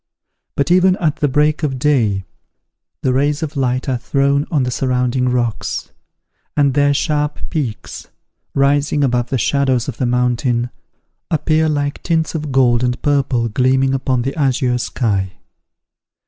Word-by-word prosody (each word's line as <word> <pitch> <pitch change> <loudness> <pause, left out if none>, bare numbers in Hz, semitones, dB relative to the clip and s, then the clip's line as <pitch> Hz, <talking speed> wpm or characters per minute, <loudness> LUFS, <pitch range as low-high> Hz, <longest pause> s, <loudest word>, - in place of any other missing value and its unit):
But, 140 +4 0
even 185 +1 +5
at 160 -5 -1
the 145 - +1
break 150 +3 +1
of 140 -4 -1
day, 115 -9 +1 0.8
the 130 - +2
rays 145 +4 +1
of 155 0 -5
light 130 -1 -1
are 130 -3 -1
thrown 140 +3 +1
on 145 -5 +1
the 125 - -2
surrounding 125 0 0
rocks; 120 -3 -2 0.7
and 140 -2 +3
their 145 +1 +3
sharp 150 0 0
peaks, 130 -9 -4 0.5
rising 145 +1 +2
above 125 -2 0
the 135 - 0
shadows 130 0 +1
of - - -5
the 125 - 0
mountain, 125 0 0 0.6
appear 160 0 +1
like 145 -1 -2
tints 160 -2 0
of 155 -3 -4
gold 125 -2 +3
and 125 0 0
purple 135 -5 +1
gleaming 130 +3 +2
upon 130 -2 0
the 135 +2 -3
azure 130 -4 +1
sky. 105 -5 -1
135 Hz, 145 wpm, -18 LUFS, 125-145 Hz, 0.8 s, even